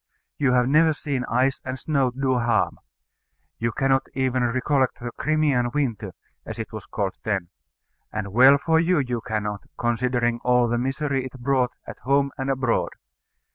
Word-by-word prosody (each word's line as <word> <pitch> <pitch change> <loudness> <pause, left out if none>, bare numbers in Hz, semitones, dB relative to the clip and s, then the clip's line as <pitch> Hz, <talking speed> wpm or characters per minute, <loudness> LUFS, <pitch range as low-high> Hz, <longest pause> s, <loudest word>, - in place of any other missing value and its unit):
You 135 -3 +3
have 125 -1 +3
never 155 +3 +4
seen 140 -4 -3
ice 130 +3 +1
and 130 0 -4
snow 135 -1 +1
do 130 0 0
harm. 120 -3 +1 0.8
You 115 0 0
cannot 135 +1 +1
even 130 -1 0
recollect 130 +2 +1
the 120 0 -5
Crimean 145 -3 +1
Winter, 115 -9 -2 0.3
as - - -7
it - - -6
was - - -7
called 95 -2 -2
then; 100 -5 -2 0.6
and 105 -2 -4
well 130 +4 +7
for 160 +2 +2
you 170 +2 +2
you 125 -5 -1
cannot, 105 -2 -3 0.2
considering 120 0 0
all 125 -1 +3
the 120 +1 0
misery 135 +1 -1
it 130 - -8
brought 130 0 +1
at - - -9
home 140 +1 +1
and 135 0 -3
abroad. 130 -3 0
130 Hz, 165 wpm, -24 LUFS, 120-135 Hz, 0.8 s, well